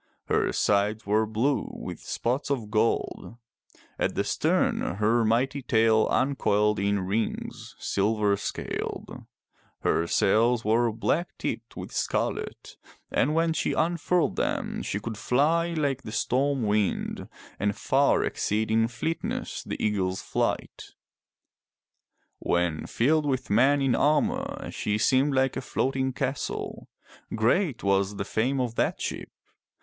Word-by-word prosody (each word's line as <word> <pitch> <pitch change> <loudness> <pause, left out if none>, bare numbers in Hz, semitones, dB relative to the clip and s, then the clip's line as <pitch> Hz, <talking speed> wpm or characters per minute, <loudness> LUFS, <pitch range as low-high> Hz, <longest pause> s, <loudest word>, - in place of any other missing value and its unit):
Her - - +2
sides 105 +2 +1
were 110 +2 +2
blue, 120 +6 0
with - - -6
spots 130 +5 -2
of 120 -7 -2
gold; 115 +1 0 0.6
at - - 0
the - - +1
stern - - +1
her 110 +3 +2
mighty 125 +5 +1
tail 110 -2 +3
uncoiled 105 -6 +2
in 100 0 +1
rings, 100 +4 -3
silver 105 0 +1
scaled; 100 - -5 0.6
her 85 - +1
sails 115 +7 +2
were 115 +2 +3
black 140 +10 -1
tipped - - -5
with - - -7
scarlet, - - -3 0.3
and 150 +3 +2
when 165 0 +2
she - - 0
unfurled 170 +1 +1
them - - -1
she 100 - -3
could 110 0 -6
fly 165 +6 +2
like 140 -4 0
the 110 - -8
storm 135 +3 +1
wind, 105 -1 -1 0.3
and 100 0 0
far 140 +1 +2
exceed 110 +1 -1
in 115 0 +3
fleetness 160 +8 -3
the - - -5
eagle's 95 -3 0
flight. - - -3 1.4
When 85 -3 0
filled 150 +5 +2
with 130 -4 -1
men 135 +6 +4
in 135 -2 +2
armor 240 - 0
she 105 0 -1
seemed 135 +5 +3
like 130 0 +2
a - - -2
floating 130 +1 -1
castle. 135 +1 -4 0.5
Great 125 - +1
was 100 0 +1
the 100 - -3
fame 125 +6 0
of 125 -3 -1
that - - 0
ship. - - -4
115 Hz, 130 wpm, -27 LUFS, 105-140 Hz, 1.4 s, men